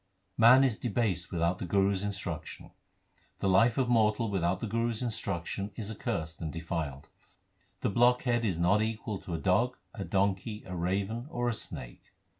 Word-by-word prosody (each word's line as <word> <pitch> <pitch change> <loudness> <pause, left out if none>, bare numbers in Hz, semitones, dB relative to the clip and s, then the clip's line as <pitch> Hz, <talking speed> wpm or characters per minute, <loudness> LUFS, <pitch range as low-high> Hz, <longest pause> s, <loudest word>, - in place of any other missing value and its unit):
Man 120 +4 +7
is 125 -5 +1
debased 100 -7 -1
without 85 +1 0
the - - -3
Guru 100 +1 +3
s 95 - -2
instruction: 100 -5 -5 0.7
The - - -1
life 110 +5 +4
of 130 -2 +2
mortal 110 -1 +2
without 95 -1 0
the - - -3
Guru 115 +2 0
s 115 +1 -3
instruction 100 -4 -3
is 110 -2 -5
accursed 80 -6 -4
and 80 -2 -3
defiled. 80 -4 -4 0.7
The - - 0
blockhead 120 +1 +3
is 95 -7 0
not 90 +5 +3
equal 110 -2 -3
to 85 - -5
a - - -1
dog, 105 +9 +1 0.2
a 100 - -5
donkey, 100 +2 -1
a 90 - -6
raven, 100 +8 -2
or 120 -4 -1
a - - 0
snake. - - -5
100 Hz, 175 wpm, -30 LUFS, 90-115 Hz, 0.7 s, Man